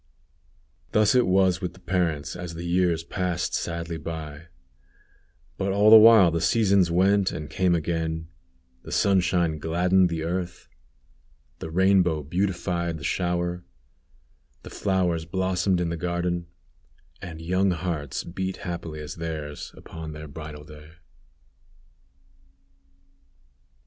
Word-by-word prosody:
Thus 105 +1 +4
it 125 -1 +3
was 95 -1 +3
with 90 -2 -4
the - - -16
parents 85 -6 -1
as 90 -2 -7
the 85 - -6
years 85 -1 +1
passed 90 -1 -2
sadly 85 0 -3
by, 80 0 -7 1.1
but 95 0 0
all 105 +2 +4
the - - +12
while 110 -5 +8
the 85 0 -1
seasons 100 -1 +3
went 95 +3 +3
and 75 0 -6
came 90 -2 +2
again; 80 0 -2 0.5
the - - -11
sunshine 90 -5 +2
gladdened 90 +3 +2
the 80 -1 -3
earth; 90 +1 -4 0.9
the 80 - -6
rainbow 90 -3 +3
beautified 85 0 -2
the 75 - -11
shower; 90 0 -1 1.0
the - - -10
flowers 90 -5 0
blossomed 95 +1 0
in 85 -1 -1
the 85 - -3
garden; 85 0 -2 0.7
and 80 -2 -8
young 90 +4 +1
hearts 80 -6 -3
beat 95 +2 -4
happily 85 -3 -5
as 75 +2 -8
theirs 80 -3 -5
upon 80 -1 -8
their 75 +1 -8
bridal 75 0 -9
day. 75 +1 -14
85 Hz, 125 wpm, -25 LUFS, 80-95 Hz, 1.1 s, the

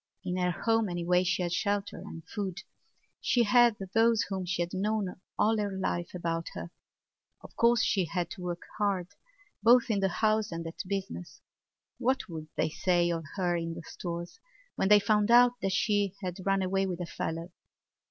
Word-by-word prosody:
In 180 -1 -2
her 180 -1 +1
home 225 +4 +1
anyway 175 +1 +1
she 180 0 0
had 175 -1 -1
shelter 200 +1 -1
and 165 - -9
food; 200 -2 -4 0.6
she 240 - +2
had 240 0 +5 0.2
those 225 -2 +4
whom 190 -2 -4
she 175 -1 0
had 170 - -7
known 195 -1 -1 0.2
all 220 +1 +3
her 205 -1 -1
life 175 -2 -2
about 165 -1 -2
her. 170 - -6 0.7
Of - - -14
course 235 -1 +4
she 190 -3 +2
had 175 0 -3
to - - -8
work 175 -1 -4 0.2
hard, 195 -4 0 0.5
both 235 +2 +5
in 205 - +1
the 195 0 +2
house 215 +2 +1
and 165 0 -4
at 165 - -5
business. 195 -2 -5 0.6
What 260 +2 +1
would 160 -3 -7
they - - +1
say 175 0 +2
of 165 -1 -3
her 180 -3 +1
in 165 -1 -3
the 170 - -8
Stores 170 0 -6 0.4
when - - +1
they 210 +1 +8
found 210 0 +2
out 245 +1 +7
that 195 - 0
she 200 0 +1
had 180 -1 -3
run 195 -1 +2
away 195 +1 +1
with 180 -2 -4
a 175 - -3
fellow? 165 +1 -4
190 Hz, 185 wpm, -30 LUFS, 175-210 Hz, 0.7 s, they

